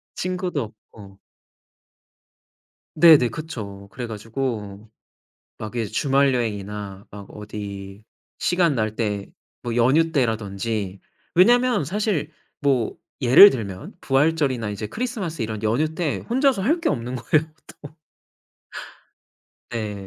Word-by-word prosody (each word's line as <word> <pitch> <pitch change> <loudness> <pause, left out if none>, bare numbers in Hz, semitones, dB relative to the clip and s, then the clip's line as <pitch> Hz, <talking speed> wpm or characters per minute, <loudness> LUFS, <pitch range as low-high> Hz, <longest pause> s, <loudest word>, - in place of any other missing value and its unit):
친구도 180 -5 -2 0.3
없고. 100 -2 -14 1.8
네네 155 -6 +7
그쵸. 105 -8 -7
그래 120 +5 -5
가지고 110 -2 -5 0.7
막 110 +1 -7
예 115 -2 -1
주말여행이나 105 -7 -1
막 100 -1 -10
어디 100 -1 -8 0.3
시간 175 -4 +2
날 110 -3 -1
때 105 -3 -2 0.3
뭐 120 -1 -3
연휴 145 +8 +3
때라든지 105 - -2 0.3
왜냐하면 240 - +4
사실 190 -4 -1 0.3
뭐 135 -6 0 0.2
예를 130 +11 +10
들면 100 - -5
부활절이나 135 -4 +1
이제 105 +1 -4
크리스마스 215 - -4
이런 110 -1 -3
연휴 145 +9 0
때 155 -4 -1
혼자서 260 -2 +2
할 300 - +1
게 - - +2
없는 120 +2 -3
거예요. 155 +5 +1
또. - - -36 2.1
네. 105 -4 -4
120 Hz, 225 characters per minute, -23 LUFS, 105-160 Hz, 2.1 s, 예를